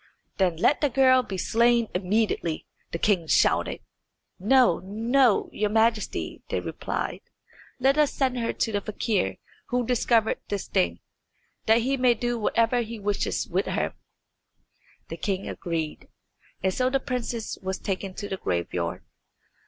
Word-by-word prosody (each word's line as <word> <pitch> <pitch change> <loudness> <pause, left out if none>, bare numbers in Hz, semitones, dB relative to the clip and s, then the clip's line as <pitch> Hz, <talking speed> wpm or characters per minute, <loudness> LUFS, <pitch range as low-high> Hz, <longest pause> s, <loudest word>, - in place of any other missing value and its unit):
"Then 185 -4 +2
let 280 - +3
the 290 - +3
girl 255 0 +5
be 195 -6 -6
slain 235 +4 +3
immediately," 185 -3 0 0.3
the - - -2
king 180 -3 +1
shouted. - - +2 0.6
"No, 240 -2 +4
no, 225 +5 +2
your 210 0 0
Majesty," 225 0 0
they - - 0
replied. - - -4 0.6
"Let 270 +3 +3
us 300 -2 +4
send 255 -2 0
her 230 - 0
to 225 - -1
the 205 -1 -1
fakir 210 -1 -1 0.3
who 245 -1 0
discovered 230 -2 +2
this 205 -2 -3
thing, 85 -2 0 0.7
that 225 +1 +5
he 270 +2 +1
may 250 -2 +4
do 240 +1 -2
whatever 230 +3 +2
he 230 0 -5
wishes 205 -1 -1
with - - -1
her." - - -1 1.2
The - - -6
king 195 -2 -2
agreed, 165 -3 -4 0.6
and 190 0 +2
so 255 +4 +1
the 270 +1 +1
princess 245 -3 -4
was 190 0 -3
taken 195 -1 -4
to 205 - -5
the 190 - -4
graveyard. 85 - -2
220 Hz, 145 wpm, -26 LUFS, 190-245 Hz, 1.2 s, girl